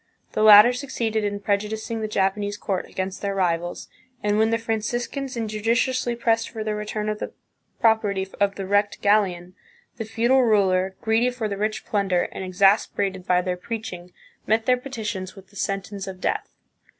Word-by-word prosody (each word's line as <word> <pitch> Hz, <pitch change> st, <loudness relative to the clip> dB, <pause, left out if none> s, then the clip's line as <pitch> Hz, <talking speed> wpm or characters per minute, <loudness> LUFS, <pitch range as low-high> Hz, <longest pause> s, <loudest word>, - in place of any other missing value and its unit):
The -, -, -1 dB
latter 215 Hz, +3 st, +9 dB
succeeded 235 Hz, -5 st, -2 dB
in 205 Hz, 0 st, -2 dB
prejudicing 215 Hz, +2 st, -2 dB
the 215 Hz, -, -1 dB
Japanese 205 Hz, 0 st, 0 dB
court 190 Hz, -3 st, -3 dB
against 190 Hz, 0 st, -4 dB
their 200 Hz, -1 st, -2 dB
rivals, 175 Hz, -2 st, -1 dB, 0.4 s
and 210 Hz, 0 st, +2 dB
when 220 Hz, 0 st, +4 dB
the 230 Hz, -, +2 dB
Franciscans 240 Hz, +4 st, -3 dB
injudiciously 230 Hz, +3 st, 0 dB
pressed 225 Hz, -1 st, +1 dB
for 220 Hz, -2 st, -5 dB
the 215 Hz, 0 st, -2 dB
return 210 Hz, 0 st, -3 dB
of 215 Hz, 0 st, -2 dB
the -, -, -5 dB, 0.5 s
property 210 Hz, -4 st, +2 dB
of 200 Hz, -1 st, +2 dB
the 195 Hz, -, -5 dB
wrecked 205 Hz, +1 st, +1 dB
galleon, 185 Hz, -4 st, +2 dB, 0.4 s
the 225 Hz, -, -4 dB
feudal 235 Hz, +4 st, +3 dB
ruler, 190 Hz, -4 st, +2 dB
greedy 225 Hz, +2 st, +2 dB
for 245 Hz, -3 st, -3 dB
the 200 Hz, -, -3 dB
rich 215 Hz, +2 st, -2 dB
plunder, 195 Hz, -4 st, +1 dB
and -, -, -6 dB
exasperated 190 Hz, 0 st, +1 dB
by 180 Hz, 0 st, +3 dB
their 180 Hz, -1 st, -2 dB
preaching, 180 Hz, -3 st, -6 dB, 0.4 s
met 220 Hz, +1 st, +2 dB
their 255 Hz, -, +4 dB
petitions 220 Hz, -8 st, -5 dB
with 195 Hz, -1 st, -15 dB
the -, -, -21 dB
sentence 195 Hz, 0 st, -3 dB
of 190 Hz, -1 st, -7 dB
death. -, -, -2 dB
210 Hz, 170 wpm, -24 LUFS, 195-225 Hz, 0.5 s, latter